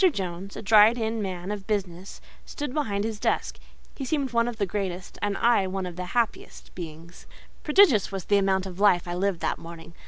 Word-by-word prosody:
Jones, 190 -1 -5
a - - -7
dried 215 +2 +6
in 225 -1 -2
man 185 -1 -4
of 200 -2 -6
business, 190 -3 -4 0.2
stood 290 -3 -6
behind 205 -10 -1
his 220 -1 -3
desk: - - -1 0.3
he 275 - -6
seemed 270 -2 -1
one 235 0 +2
of 240 -2 -4
the 205 - +1
greatest, 190 -1 -5
and 205 -1 -1
I 230 -5 +3
one 190 0 -3
of 180 -2 -6
the 180 0 -5
happiest 235 -2 -2
of - - -28
beings. 165 0 -10 0.3
Prodigious 300 - +4
was 195 -2 -5
the 205 -1 +3
amount 190 -1 +1
of 185 -1 -8
life 180 -4 +4
I 175 - -3
lived 185 -1 -1
that - - -1
morning. 165 0 -11
200 Hz, 210 wpm, -26 LUFS, 180-225 Hz, 0.3 s, dried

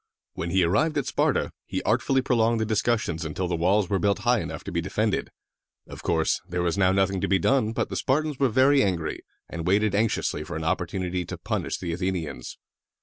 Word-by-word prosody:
When 85 - -4
he 95 +1 +3
arrived 150 - +2
at 140 - 0
Sparta, - - +1 0.2
he - - -3
artfully 135 -1 +1
prolonged 115 -2 +2
the 110 - 0
discussions 110 -6 0
until 80 +4 -3
the 90 - -1
walls 95 +4 +2
were 100 0 0
built 100 +3 +2
high 120 -1 +4
enough - - -6
to - - -6
be 85 0 -1
defended. 105 +3 -1 0.6
Of - - -10
course, 80 -1 +1
there 90 0 -1
was 85 -1 0
now 95 -2 +3
nothing 95 -1 +1
to - - 0
be 95 - +3
done; 110 +4 +2
but 115 - -2
the - - -5
Spartans 150 +1 0
were 135 -2 +3
very 135 +4 +4
angry, 90 -8 -1 0.3
and 85 0 -5
waited 100 +2 +2
anxiously 100 -7 0
for 85 +2 -7
an 80 - -4
opportunity 90 +2 -1
to - - -6
punish - - -3
the 85 -2 -4
Athenians. 90 -3 -4
95 Hz, 205 wpm, -25 LUFS, 85-115 Hz, 0.6 s, high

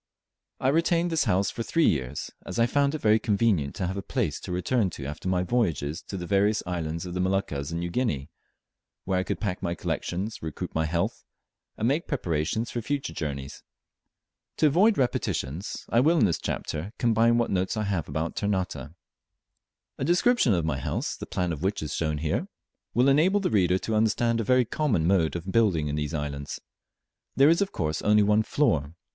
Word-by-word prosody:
I 130 - +2
retained 170 +3 +2
this 160 -4 +2
house 100 -2 +2
for 115 - -5
three 165 +7 +2
years, 65 -1 -1
as - - -6
I 115 - +4
found 140 +4 +1
it 155 - -5
very 110 +1 +4
convenient 100 - +1
to 95 - -2
have 95 +2 -3
a - - -2
place - - -2
to - - -7
return 95 +4 +1
to 75 -5 -8
after 75 +6 -4
my 90 -1 +1
voyages 85 - 0
to 100 - -5
the 90 - -5
various 100 +3 +2
islands 85 -1 -3
of 90 - -6
the 90 - -3
Moluccas 90 -7 -1
and 85 - -2
New 85 0 -3
Guinea, 80 - -1 0.7
where 95 -1 +1
I - - 0
could - - -3
pack 100 -4 -3
my 85 0 -2
collections, 95 +6 -3
recruit 80 -2 -5
my 80 0 +1
health, 85 +2 -1 0.5
and 110 - 0
make 145 +6 0
preparations 90 - -1
for 120 - -3
future 140 +4 -3
journeys. 70 -3 -5 1.0
To - - +3
avoid 185 +9 +4
repetitions, 90 - -2
I 115 - +3
will 160 +7 +4
in 120 - +5
this 85 -5 0
chapter 85 +8 -4
combine 115 0 +3
what 120 - +1
notes 95 +3 0
I 110 - 0
have 95 -8 -2
about 80 +3 -2
Ternate. 90 -8 -2 1.1
A - - -1
description 175 - +3
of 85 -2 0
my 75 -4 -1
house - - -2
(the - - -8
plan 90 -1 -1
of 75 - -7
which 95 -2 -1
is 75 -1 -4
here 75 -2 -1
shown) 75 +1 -1 0.5
will 125 +3 +4
enable 165 +9 +4
the 195 - -1
reader 95 -4 +3
to 110 - -3
understand 115 +2 +2
a - - 0
very 125 +3 +3
common 115 - 0
mode 85 -3 +2
of 85 +2 -4
building 95 -10 +2
in 75 - -2
these 75 +1 -2
islands. 70 -1 -4 0.8
There 140 +2 +6
is 170 +4 +3
of 200 - 0
course 75 -2 -2
only 105 0 +4
one 105 +1 +4
floor. 80 - 0
95 Hz, 200 wpm, -27 LUFS, 80-120 Hz, 1.1 s, There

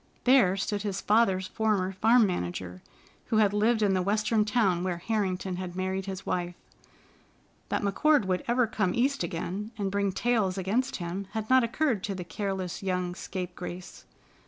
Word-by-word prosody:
There 245 -8 +5
stood 205 +1 -2
his 200 -2 -3
father's 200 -4 +2
former 205 -3 0
farm 225 +5 +4
manager, 90 - -4 0.5
who 220 - +1
had 205 -2 +4
lived 220 +2 +2
in 200 -2 +3
the 185 - +1
Western 210 +3 +1
town 205 -5 +1
where 180 -2 -1
Harrington 190 -2 -2
had 180 -1 -6
married 190 +1 -2
his 190 0 -5
wife. 175 -1 -2 1.1
That - - -1
McCord 275 +6 +3
would 185 -1 -1
ever 245 +1 +3
come 200 -5 -1
East 275 +4 +1
again 195 +4 -3
and 200 -2 -2
bring 200 0 +1
back 190 - -6
tales 220 -6 +1
against 225 +8 0
him 185 +2 -4
had 220 +1 -3
not 260 -1 +6
occurred 235 -3 0
to 200 - -3
the 180 - -5
careless 185 +1 -4
young 180 -2 -1
scapegrace. 180 0 -7
195 Hz, 170 wpm, -28 LUFS, 185-220 Hz, 1.1 s, not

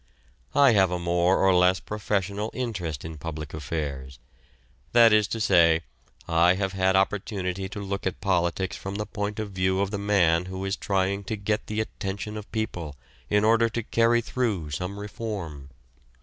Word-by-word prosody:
I 140 -2 +7
have 95 -4 +4
a 90 - -1
more 85 +1 +2
or 95 -1 +4
less 90 +1 +4
professional 105 0 -2
interest 90 - -4
in 80 -1 -7
public 75 -1 -6
affairs; 70 -3 -4 0.8
that 115 -2 +7
is 105 -1 +4
to 115 - -3
say, 85 -6 +4 0.5
I 85 +2 +4
have 95 0 -2
had 95 0 +2
opportunity 95 -1 -1
to 105 - -6
look 100 -1 -3
at 95 - -4
politics 90 -1 0
from 95 +1 -6
the 105 +1 -2
point 105 0 -4
of 110 -2 -4
view 95 0 0
of 100 0 0
the 100 - -3
man 90 -5 +3
who 95 +1 -5
is 95 +1 -1
trying 100 0 -1
to 110 - -2
get 105 +1 -2
the 110 0 -1
attention 100 0 -5
of 105 -1 -8
people 90 - -3 0.3
in 105 0 +3
order 115 +1 +4
to 115 +1 -3
carry 115 +2 +3
through 110 - -2
some 90 +7 -4
reform. 100 -10 -6
95 Hz, 175 wpm, -26 LUFS, 85-105 Hz, 0.8 s, I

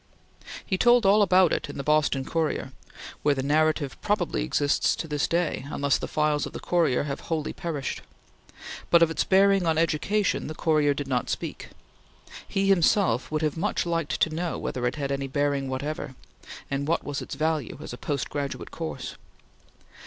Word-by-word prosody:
He 190 -2 -1
told 240 -2 +5
all 200 +2 +6
about 185 -3 +5
it - - 0
to - - -7
the 140 - -5
Boston 150 -3 +2
Courier; 155 -5 -1 0.5
where 145 -1 +2
the 135 - -2
narrative 155 0 +1
probably 185 - 0
exists 145 - +1
to 165 - -5
this 150 -2 0
day, 165 -5 -1
unless 140 -1 +1
the - - -4
files 150 -2 0
of - - -11
the - - -5
Courier 165 -8 +1
have 140 -1 -4
wholly 160 -2 -1
perished; 155 -6 -4 0.9
but 170 -1 +6
of 165 - +2
its - - 0
bearing 195 -1 +4
on 160 -1 +2
education 165 +6 +1
the 155 - -6
Courier 150 -3 +2
did 145 -1 -4
not 125 -2 -1
speak. - - -4 0.8
He 195 0 0
himself 180 - +3
would 155 0 -1
have 155 0 0
much 190 +2 -1
liked 165 -3 -1
to 160 - +2
know 170 +1 -2
whether 125 -1 -2
it 125 - -2
had 140 -2 -3
any 140 0 -2
bearing 140 0 0
whatever, 140 0 -4 0.6
and 140 +1 -1
what 170 - +1
was 145 -1 -4
its - - -6
value 155 -5 -1
as 155 - -8
a - - -7
post 140 -3 -2
graduate 140 -2 -4
course. 160 -6 -6
155 Hz, 180 wpm, -26 LUFS, 140-170 Hz, 0.9 s, all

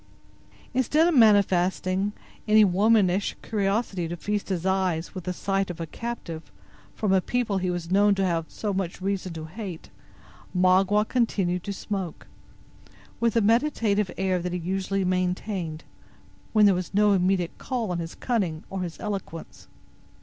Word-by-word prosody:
Instead 290 +6 +3
of 350 - +2
manifesting 195 - +3 0.4
any 215 0 +6
womanish 200 0 +3
curiosity 200 -4 -1
to 175 +1 -5
feast 205 +3 -3
his 180 -2 -2
eyes 185 -3 0
with 185 -3 -7
the 180 - -1
sight 195 +1 -1
of 175 -1 -6
a 165 - -3
captive 170 -5 -6 0.4
from 205 -3 +1
a 190 - +4
people 225 -3 -1
he 185 0 -1
was 175 -1 -4
known 200 +1 +4
to 195 0 +1
have 165 -3 0
so 210 -2 -3
much 185 -2 -3
reason 190 -1 -2
to 160 -1 -6
hate, 180 0 -8 0.6
Magua 190 +3 +4
continued 190 -8 0
to 200 - -3
smoke, 195 -3 -5 0.9
with 230 -1 +1
the 230 - +3
meditative 220 -4 +2
air 185 -1 +1
that 180 0 -4
he - - -1
usually 190 +2 -1
maintained, 180 -2 -2 0.7
when 215 -1 +5
there 200 - +6
was 180 +1 -4
no 210 0 +5
immediate 185 -2 +1
call 240 -7 -2
on 175 - -2
his 165 0 -6
cunning 190 -11 -1
or 195 -1 -3
his 175 -2 -5
eloquence. 195 -6 -6
190 Hz, 155 wpm, -26 LUFS, 180-210 Hz, 0.9 s, any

